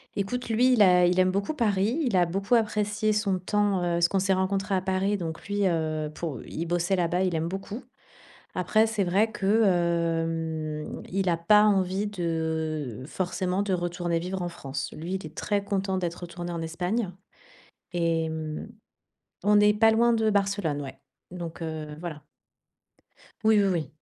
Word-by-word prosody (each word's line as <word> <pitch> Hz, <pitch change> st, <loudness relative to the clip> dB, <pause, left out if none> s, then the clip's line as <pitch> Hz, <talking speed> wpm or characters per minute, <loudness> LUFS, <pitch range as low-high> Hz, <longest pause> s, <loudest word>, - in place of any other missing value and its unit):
Écoute, 235 Hz, +5 st, -3 dB
lui, 250 Hz, +3 st, +4 dB
il 220 Hz, -, +6 dB
a 180 Hz, -2 st, +6 dB
il 180 Hz, +1 st, +2 dB
aime 185 Hz, 0 st, +4 dB
beaucoup 200 Hz, +11 st, -1 dB
Paris, 215 Hz, +3 st, +1 dB
il 225 Hz, -6 st, 0 dB
a 175 Hz, -1 st, +4 dB
beaucoup 195 Hz, +6 st, -1 dB
apprécié 215 Hz, -1 st, +1 dB
son 200 Hz, -3 st, 0 dB
temps, 205 Hz, +1 st, +1 dB
heu, -, -, -3 dB
parce 170 Hz, 0 st, +4 dB
qu'on 195 Hz, -, +1 dB
s'est 190 Hz, +1 st, +2 dB
rencontrés 195 Hz, +1 st, 0 dB
à 185 Hz, -, +1 dB
Paris, 190 Hz, +2 st, 0 dB
donc 165 Hz, -2 st, -6 dB
lui, 205 Hz, 0 st, 0 dB
heu, 155 Hz, -3 st, 0 dB
pour 160 Hz, -4 st, -5 dB
il 165 Hz, +2 st, -5 dB
bossait 175 Hz, +2 st, +1 dB
là-bas, 180 Hz, +1 st, +1 dB
il 185 Hz, -, 0 dB
aime 160 Hz, 0 st, -1 dB
beaucoup. 195 Hz, +7 st, -6 dB, 0.7 s
Après, 215 Hz, +5 st, +3 dB
c'est 215 Hz, -3 st, 0 dB
vrai 200 Hz, +5 st, +2 dB
que, 195 Hz, -, -4 dB, 0.2 s
hem, 165 Hz, -3 st, -1 dB
il 190 Hz, 0 st, 0 dB
a 165 Hz, -, +2 dB
pas 210 Hz, +5 st, +5 dB
envie 195 Hz, 0 st, +1 dB
de 160 Hz, -, -2 dB
forcément 185 Hz, +2 st, -2 dB
de 205 Hz, -1 st, -2 dB
retourner 175 Hz, -1 st, -1 dB
vivre 180 Hz, +2 st, -3 dB
en 175 Hz, -, -2 dB
France. 140 Hz, -5 st, -5 dB
Lui, 170 Hz, +4 st, -5 dB
il 190 Hz, -, -5 dB
est 155 Hz, -, -16 dB
très 205 Hz, -1 st, 0 dB
content 195 Hz, -1 st, -1 dB
d'être 175 Hz, 0 st, -4 dB
retourné 175 Hz, 0 st, -6 dB
en 170 Hz, -, -4 dB
Espagne 180 Hz, +6 st, -2 dB, 0.8 s
et 165 Hz, -2 st, +1 dB
hem 160 Hz, +3 st, -5 dB, 0.7 s
on 210 Hz, +1 st, +4 dB
n'est 210 Hz, 0 st, +6 dB
pas 225 Hz, +1 st, +5 dB
loin 235 Hz, +2 st, +4 dB
de 220 Hz, -1 st, +2 dB
Barcelone, 195 Hz, -7 st, 0 dB
ouais. 135 Hz, -1 st, -8 dB, 0.3 s
Donc, 170 Hz, -2 st, -7 dB
heu, 155 Hz, -2 st, -5 dB
voilà. 155 Hz, -4 st, -6 dB, 1.2 s
Oui, 220 Hz, -1 st, +5 dB
oui, 200 Hz, -, +3 dB
oui. 160 Hz, -7 st, -2 dB
185 Hz, 175 wpm, -27 LUFS, 165-205 Hz, 1.2 s, il